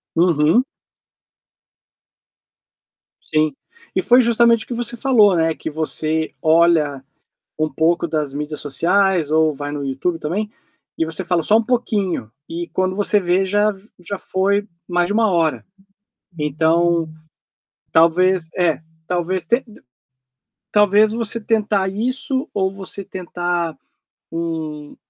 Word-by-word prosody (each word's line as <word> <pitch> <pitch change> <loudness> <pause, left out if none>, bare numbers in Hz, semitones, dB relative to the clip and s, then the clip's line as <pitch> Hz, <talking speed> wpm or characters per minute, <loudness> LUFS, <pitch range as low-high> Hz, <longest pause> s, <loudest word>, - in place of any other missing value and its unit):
Uhum. 165 - +3 2.6
Sim. 155 -2 0 0.4
E 185 - +2
foi 245 +6 +5
justamente 235 -1 +3
o - - -33
que - - -4
você 240 0 -1
falou, 220 -8 +4
né, 160 -1 +2
que - - -6
você 155 0 -1
olha 160 -4 +3 0.6
um 155 0 +1
pouco 165 +4 +1
das 150 -3 -2
mídias 150 +1 -4
sociais 175 +2 +1
ou 155 -1 +3
vai 145 +1 -5
no 145 -1 -4
YouTube 140 +6 -2
também 200 +8 -3 0.5
e 165 - +2
você 160 +3 -3
fala 175 -2 +1
só 210 - +4
um 225 - +3
pouquinho 210 - -1 0.2
e 170 +1 -5
quando 185 0 -1
você 205 0 +3
vê 185 +1 +1
já 205 +2 +2
v 200 +1 -13
já 195 +3 -5
foi 200 +3 0 0.2
mais 175 -1 +1
de 195 - -2
1 220 0 +2
hora. 165 -3 0 0.7
Então, 165 +2 +1 0.8
talvez 170 +1 +3
É. 175 -4 +1 0.3
Talvez 180 +1 -1
tenta 235 0 0 1.0
talvez 210 +1 +4
você 230 0 -1
tentar 210 -3 0
isso 255 - -2
ou 190 -1 0
você 195 0 -6
tentar 175 -4 -3 0.5
um 160 -3 -5
175 Hz, 130 wpm, -19 LUFS, 160-205 Hz, 2.6 s, foi